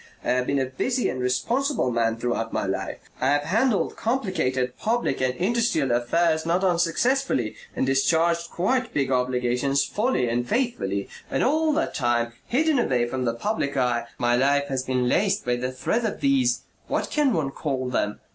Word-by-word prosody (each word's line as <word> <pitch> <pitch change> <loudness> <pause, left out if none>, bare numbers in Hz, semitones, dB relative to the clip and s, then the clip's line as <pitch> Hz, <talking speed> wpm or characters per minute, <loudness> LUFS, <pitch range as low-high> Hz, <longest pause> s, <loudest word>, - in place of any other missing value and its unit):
I - - -2
have 125 0 +1
been 140 - +1
a 135 - +1
busy 240 - -1
and 130 - -3
responsible 130 - 0
man 115 -1 +1
throughout 115 -1 -2
my - - -1
life. - - -4
I 130 - +1
have 145 +1 +2
handled 220 - +1
complicated 185 - -1
public 225 - 0
and 130 -1 +1
industrial 200 - +1
affairs 160 +7 +2
not 175 +3 0
unsuccessfully 180 - +1 0.2
and - - 0
discharged 165 +5 +2
quite 250 +7 -1
big 135 -2 +1
obligations 125 +2 +1
fully 215 - 0
and 120 +1 -1
faithfully. 210 - -1 0.2
And - - 0
all 310 +3 +2
the 320 +2 +1
time, 120 -2 -1
hidden 300 +2 +2
away 125 - +1
from 130 +1 -2
the 115 -1 0
public 140 - -2
eye, 120 -2 +1
my 120 0 +2
life 140 +2 +2
has 135 -1 -1
been 130 -1 0
laced 200 +8 +1
by 125 0 +1
the 125 +1 -3
thread 220 - -1
of 220 - -2
these 275 -3 +2 0.3
what - - -2
can 295 -3 +2
one 155 - 0
call 135 -3 -3
them? 105 -4 -1
140 Hz, 175 wpm, -24 LUFS, -, 0.3 s, have